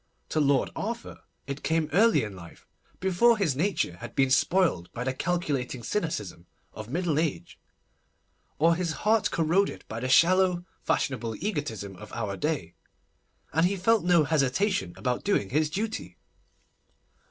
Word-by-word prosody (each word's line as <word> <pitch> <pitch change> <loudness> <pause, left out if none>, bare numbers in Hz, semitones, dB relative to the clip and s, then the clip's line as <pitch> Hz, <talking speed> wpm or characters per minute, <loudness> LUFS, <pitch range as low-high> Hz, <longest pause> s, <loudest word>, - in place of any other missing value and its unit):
To 155 - 0
Lord 140 -3 +2
Arthur 235 +3 -5 0.3
it 140 +1 -5
came 160 +2 0
early 200 - +4
in 105 -3 -6
life—before 185 - -1
his 170 -10 +1
nature 160 - -1
had - - -9
been 135 -1 +2
spoiled 135 - +2
by 120 - -4
the 130 0 -1
calculating 140 -6 -2
cynicism 105 - -3 0.3
of 110 +1 -8
middle 165 0 0
age, 160 -3 -3 1.0
or 165 +2 +4
his 170 -1 -1
heart 220 0 +3
corroded 170 +5 0
by 115 - -5
the 130 +2 -3
shallow, 180 +4 +4 0.2
fashionable 115 -4 -1
egotism 145 - -4
of 105 +2 -11
our 105 -4 -3
day, 145 - -2 0.8
and 160 +4 +4
he 200 - -1
felt 220 +4 +2
no 175 -2 +4
hesitation 145 - +1
about 125 -2 -2
doing 195 - 0
his 150 +2 +2
duty. 215 +7 -4
155 Hz, 140 wpm, -27 LUFS, 125-185 Hz, 1.0 s, early